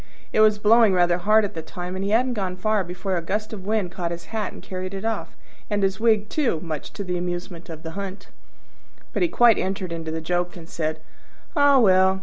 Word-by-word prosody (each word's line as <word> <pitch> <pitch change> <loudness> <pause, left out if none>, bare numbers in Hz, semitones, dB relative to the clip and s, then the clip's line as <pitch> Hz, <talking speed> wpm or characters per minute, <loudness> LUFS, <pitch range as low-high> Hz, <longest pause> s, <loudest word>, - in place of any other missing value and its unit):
It - - +2
was 215 -1 +6
blowing 220 0 +5
rather 175 -1 +3
hard 215 +4 +4
at 205 - -5
the 160 - -5
time, 180 +3 -6
and 190 - -3
he 200 - -1
hadn't 245 +4 +2
gone 190 -5 -2
far 215 +2 +1
before 185 +2 -3
a - - -1
gust 210 +6 -3
of 195 -2 -7
wind 210 -5 0
caught 175 -1 -3
his 170 0 -6
hat 215 -3 -2
and - - -11
carried 185 +1 -5
it 195 +3 -5
off, 225 -2 -3 0.3
and 205 -2 0
his 195 +1 +1
wig 220 -2 +3
too, 245 - 0
much 155 -4 -5
to 200 - -5
the 180 -2 -2
amusement 175 0 -5
of 160 -1 -8
the 160 - -5
hunt. 195 +1 -7 0.8
But - - -1
he 355 - +4
quite 240 -8 +5
entered 190 -1 -2
into 165 -1 -4
the 160 +1 -3
joke, 175 +2 -2
and 165 -1 -11
said, 155 -2 -3 0.5
"Ah, 285 -2 +6
well! 190 -4 +5
190 Hz, 230 wpm, -24 LUFS, 175-215 Hz, 0.8 s, was